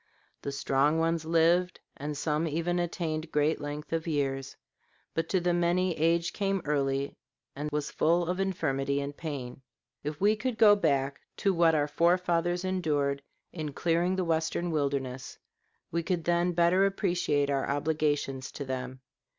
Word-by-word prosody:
The 140 - -4
strong 140 +2 +2
ones 165 0 0
lived, 170 +3 +3 0.2
and 145 +1 -5
some 155 +2 0
even 170 +3 -1
attained 165 -2 -2
great 150 +1 +1
length 145 +2 -5
of 165 0 -1
years; 135 -3 -1 0.6
but 165 0 -2
to 190 - +2
the 175 0 +1
many 175 +1 +1
age 165 +2 +1
came 195 -1 0
early 140 -1 0 0.4
and 145 +2 -3
was 150 0 -2
full 170 +2 +2
of 180 +2 -1
infirmity 140 -7 0
and 140 0 -4
pain. 135 -6 -6 0.4
If 150 +1 -4
we 210 +2 +4
could 245 +1 -3
go 215 -2 +7
back 140 -7 0 0.2
to 195 - +2
what 165 -2 +4
our 145 -1 +2
fore 170 +4 +3
fathers 175 0 0
endured 150 -7 0 0.3
in 155 -4 -4
clearing 175 +4 +1
the 185 -1 -1
Western 165 +1 0
wilderness, 135 -4 -2 0.5
we 170 - 0
could 170 0 -1
then 175 +1 +1
better 175 +3 +4
appreciate 175 -8 0
our 135 -1 0
obligations 145 -2 -1
to 140 - -5
them. 130 0 -5
160 Hz, 160 wpm, -29 LUFS, 145-175 Hz, 0.6 s, go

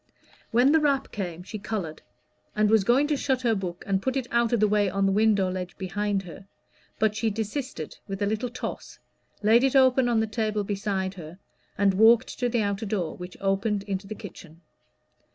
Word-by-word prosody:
When 245 +4 +4
the 320 - +5
rap 280 -3 +1
came, 180 -4 -5
she 215 +3 -7
colored, 195 -7 -4 0.5
and 215 0 +2
was 220 -3 +5
going 245 +7 +3
to 295 0 0
shut 265 -2 -1
her 235 -2 +3
book 180 -4 -4
and 195 -1 0
put 260 +4 -1
it 260 - -1
out 235 -1 +2
of 240 - +2
the 215 - +4
way 205 -1 +2
on 195 +1 0
the 195 - +3
window 205 -1 +3
ledge 180 0 -5
behind 200 +1 -2
her; 180 +2 -11 0.5
but 215 -1 +1
she 220 +1 0
desisted 220 - -5
with 195 0 -5
a 205 - +1
little 220 +4 -1
toss, 245 - -7 0.5
laid 225 +4 +5
it 270 0 +2
open 260 -1 +5
on 235 -2 +2
the 220 - +2
table 215 -1 -1
beside 195 -1 -2
her, 170 -2 -10 0.4
and 200 -1 +3
walked 225 +5 +4
to 245 -1 +1
the 235 -2 +1
outer 200 +2 -2
door, 190 -6 -2
which 180 0 -9
opened 195 +1 0
into 195 -1 -4
the 215 - -6
kitchen. 175 -6 -12
210 Hz, 205 wpm, -26 LUFS, 195-235 Hz, 0.5 s, the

